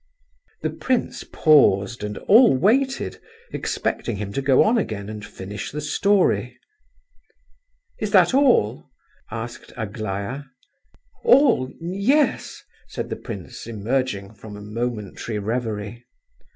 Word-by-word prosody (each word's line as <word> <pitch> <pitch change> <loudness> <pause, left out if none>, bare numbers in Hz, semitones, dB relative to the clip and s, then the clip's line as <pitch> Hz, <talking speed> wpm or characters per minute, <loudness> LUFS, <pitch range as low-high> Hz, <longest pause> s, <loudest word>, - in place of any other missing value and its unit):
The - - 0
prince 255 -2 -1
paused 120 - +3
and 105 0 -4
all 225 - +6
waited, 260 - +1 0.3
expecting 115 - -2
him 100 0 -5
to 140 - -1
go 135 -1 +5
on 230 +2 +3
again 105 - -4
and 105 -1 -7
finish 100 0 -7
the 150 - -4
story. 195 +6 +1 1.4
"Is - - -2
that - - +5
all?" 255 - +3 0.4
asked 120 +1 -7
Aglaya. 110 +5 -4 0.8
"All? 245 - +4
Yes," 200 - 0 0.2
said - - -6
the - - -1
prince, - - -8
emerging 110 -2 -2
from 105 0 -11
a - - -10
momentary 110 -1 -4
reverie. 110 +1 -3
120 Hz, 110 wpm, -23 LUFS, -, 1.4 s, all